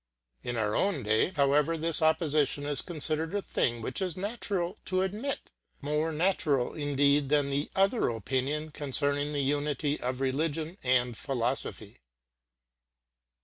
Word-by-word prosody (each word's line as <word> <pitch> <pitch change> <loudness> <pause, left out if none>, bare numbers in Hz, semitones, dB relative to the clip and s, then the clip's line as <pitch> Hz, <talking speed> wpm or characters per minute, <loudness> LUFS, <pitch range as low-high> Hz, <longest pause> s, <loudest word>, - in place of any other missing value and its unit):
In 120 -1 -4
our 105 -1 0
own 190 -10 +1
day, 110 +8 +2
however, 145 +3 +3
this 165 +1 +2
opposition 155 -3 +2
is 145 -2 +3
considered 160 +1 -2
a 205 - 0
thing 120 -1 -1
which 195 - -2
it - - +2
is 180 -2 -4
natural 200 -2 -2
to 185 0 +1
admit 215 +9 -4 0.3
more 150 +3 -1
natural 155 -6 +1
indeed 145 -1 +2
than 145 -1 +2
the 140 +2 -1
other 195 - +2
opinion 135 +7 -2
concerning 145 0 0
the 145 -1 -1
unity 145 +1 0
of 125 +1 -2
religion 155 +6 -1
and 125 -2 +2
philosophy. 120 - -3
145 Hz, 140 wpm, -29 LUFS, 135-165 Hz, 0.3 s, however